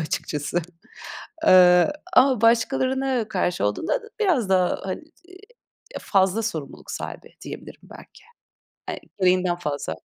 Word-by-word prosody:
açıkçası. 155 +1 -3 0.8
Eee, 180 +6 +6 0.2
ama 255 -5 +4
başkalarına 260 +1 +1
karşı 180 - -1
olduğunda 105 - -1 0.2
biraz 305 - +1
daha, 185 -1 +2
hani, 190 +10 -5 0.2
eee, 370 +1 -14 0.6
ya, - - -5
fazla 195 +2 +1
sorumluluk 160 -10 -6
sahibi, - - -7
diyebilirim - - -10
belki. 425 - -15 0.6
Hani, - - -4 0.2
gereğinden 180 -1 +2
fazla. 150 -5 -4
190 Hz, 115 wpm, -23 LUFS, 175-260 Hz, 0.8 s, Eee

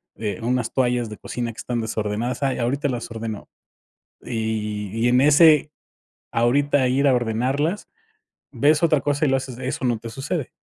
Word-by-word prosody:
eh, 105 0 -4
unas 120 0 -1
toallas 125 -3 +1
de 105 - -8
cocina 120 -1 -4
que 110 - -18
están 120 -1 -3
desordenadas: 110 +3 -2
"Ay, 135 - 0
ahorita 140 +5 0
las 120 -2 -4
ordeno". 115 -2 -6 0.8
Y 110 -3 -3
y 115 +2 +2
en 125 +1 +4
ese, 150 +1 +6 0.6
ahorita 135 +3 +2
ir 140 +3 +2
a 130 - +4
ordenarlas, 130 - -1 0.6
ves 150 +3 +2
otra 155 -4 +3
cosa 145 +1 0
y - - +2
lo 135 - +3
haces, 130 -2 -6
¿eso 130 +1 -4
no 120 -3 +1
te 115 - -8
sucede? 135 +4 -4
125 Hz, 170 wpm, -22 LUFS, 115-140 Hz, 0.8 s, ese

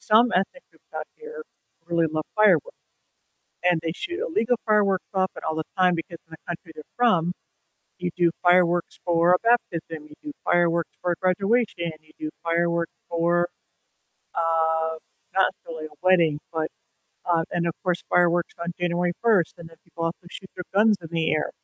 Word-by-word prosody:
some 225 +2 +4
ethnic 195 - 0
groups - - -28
out - - -3
here 465 0 -9 0.5
really 170 -1 +2
love 155 -1 -2
fireworks. 215 - +5 0.9
And 175 -2 +3
they 165 - -1
shoot 350 +2 -4
illegal 245 - +1
fireworks 205 -3 +3
up 190 0 +1
and - - -9
all 160 - -1
the 160 - -1
time 180 -1 +4
because 170 +1 -6
in - - -30
the 160 - -9
country 170 -1 -6
they're 155 - -9
from, 180 -9 +3 0.7
you 180 -1 -2
do 175 -1 +4
fireworks 175 -1 +3
for 170 0 +4
a 180 - +5
baptism, 165 -9 0
you 150 - -14
do 300 - -6
fireworks 170 -1 +2
for 180 - +1
a - - 0
graduation, 195 -1 +1
you 155 - -24
do 310 0 -4
fireworks 170 0 0 0.2
for, 175 +1 +2 0.9
uh 160 -1 +1 0.4
not 190 -1 +5 0.2
necessarily 160 -1 -6
a 150 - -19
wedding, 170 -5 +4
but, 160 -1 -1 0.6
uh 170 -2 +2
and 170 -1 0
of 170 - -1
course, 180 -1 0
fireworks 175 -1 +3
on 170 - -4
January 175 0 +1
1st, 215 -8 +3
and 165 -1 -11
then 165 - -17
people 165 0 -5
also 170 +1 -4
shoot 190 - -10
their 180 - -5
guns 210 +1 +5
in 165 - -9
the 165 -1 +1
air 155 - 0
175 Hz, 180 wpm, -25 LUFS, 165-190 Hz, 0.9 s, fireworks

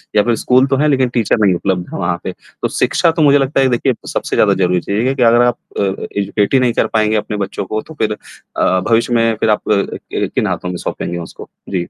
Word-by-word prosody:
या 105 - +5
फिर 120 -1 +1
स्कूल 130 +3 +3
तो 135 - +1
है 150 +2 +2
लेकिन 130 -3 +2
टीचर 120 -1 +1
नहीं 95 -3 +4
उपलब्ध 90 0 -1
है - - -4
वहाँ 85 0 -1
पे। - - -3
तो - - -7
शिक्षा 165 - +1
तो 160 - -2
मुझे 145 -1 +5
लगता 135 0 0
है, 135 - +4
देखिए 125 +2 +1
सबसे - - -3
ज़्यादा - - +4
ज़रूरी 90 -1 +1
चीज़ 105 +7 -1
है 135 - 0
कि 125 - +1
अगर 120 +1 +5
आप 120 -1 +1 0.2
अ, - - +2 0.3
एजुकेट 100 +3 0
ही 130 - +5
नहीं 125 -2 +1
कर - - +1
पाएँगे 110 0 +1
अपने 105 0 -3
बच्चों 100 -1 -4
को 110 +3 -3
तो 160 - -13
फिर 105 -1 +1 0.4
अ, 95 - +2
भविष्य 115 +1 +2
में 115 -1 +2
फिर 110 - +1
आप 105 - +2
कि 100 -1 -1
किन - - +1
हाथों 90 - -3
में 90 - -4
सौंपेंगे 85 - -3
उसको? 85 - -10 0.2
जी। 95 - -4
115 Hz, 250 wpm, -16 LUFS, 100-130 Hz, 0.4 s, या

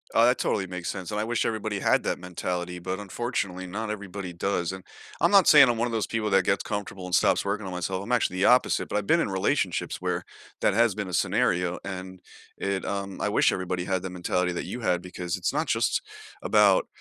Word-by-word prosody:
Oh, 115 - +6
that 125 +1 +4
totally 95 - -1
makes 90 -2 -5
sense 95 0 -5
and 105 - -2
I 105 - -1
wish 120 +1 0
everybody 110 -2 -2
had - - +2
that - - -1
mentality, 90 0 -4
but 95 +2 -3
unfortunately, 100 -2 -3
not 105 +4 -4
everybody 100 -3 -5
does. 85 0 -1
And 95 -1 -8 0.4
I'm - - +3
not 200 -3 +6
saying 150 -3 +9
I'm 120 -1 +1
one 115 - +1
of 120 - -3
those 110 -2 -1
people 110 -2 -1
that 95 -2 +3
gets - - +1
comfortable 100 -3 -5
and 90 - -7
stops - - +3
working 100 +1 -2
on 95 - -5
myself, 95 +2 -3
I'm 115 - -6
actually 110 -6 +1
the 95 - +2
opposite, 125 +1 +3
but - - -5
I've 105 -1 -3
been 170 - +4
in 165 - 0
relationships 95 -1 -1
where - - -1 0.4
that - - +3
has 115 -1 +3
been 100 -3 -4
a - - -7
scenario, 90 0 +1
and 95 -1 -7 0.4
it, 100 -1 -2
um 100 -1 -4
I - - +1
wish - - +3
everybody 90 -1 -2
had 95 0 -1
the 95 - -5
mentality 90 0 -1
that - - -3
you 125 - -5
had 90 -6 0
because 90 -1 -4
it's 90 - -1
not - - -1
just - - +1 0.4
about, 105 -3 +4
95 Hz, 235 wpm, -26 LUFS, 90-105 Hz, 0.4 s, saying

